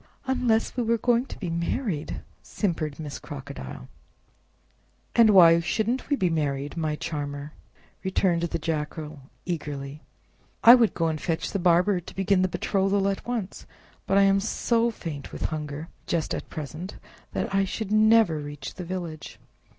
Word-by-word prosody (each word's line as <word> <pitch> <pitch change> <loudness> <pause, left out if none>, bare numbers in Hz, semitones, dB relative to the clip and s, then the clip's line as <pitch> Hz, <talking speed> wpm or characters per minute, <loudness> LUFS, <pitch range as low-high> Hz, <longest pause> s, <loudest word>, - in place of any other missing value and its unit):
"Unless 245 -4 +1
we 250 - 0
were 230 0 +2
going 240 +3 +2
to - - -8
be 180 -5 -4
married!" 170 - -2 0.2
simpered 160 -7 -2
Miss 150 -3 -6
Crocodile. 140 - -8 1.3
"And 230 -2 +7
why 170 -4 +8
shouldn't 220 +10 -1
we 290 - +3
be 185 - +1
married, 145 -3 -1
my 155 -2 -1
charmer?" 145 -1 -5 0.5
returned 185 -2 +1
the 170 0 -1
Jackal 155 -1 -4 0.3
eagerly. 145 -4 -4 0.6
"I 235 - +11
would 240 -4 +4
go 165 - +1
and 155 -1 -2
fetch 165 -3 -2
the 200 - -1
barber 180 +2 +3
to 175 - -12
begin 195 0 +2
the 185 - +3
betrothal 195 +1 +1
at 195 - -4
once, 230 -6 -4 0.4
but 195 - +3
I 200 - +6
am 195 0 +4
so 230 +3 +1
faint 160 -10 -7
with - - -6
hunger 150 0 -5 0.2
just 165 -3 -1
at - - -5
present 155 +5 -6 0.4
that - - -2
I 195 0 +3
should 205 +2 -4
never 215 -6 +5
reach 145 0 -7
the 180 - -7
village. 170 -3 -6
175 Hz, 160 wpm, -26 LUFS, 155-205 Hz, 1.3 s, I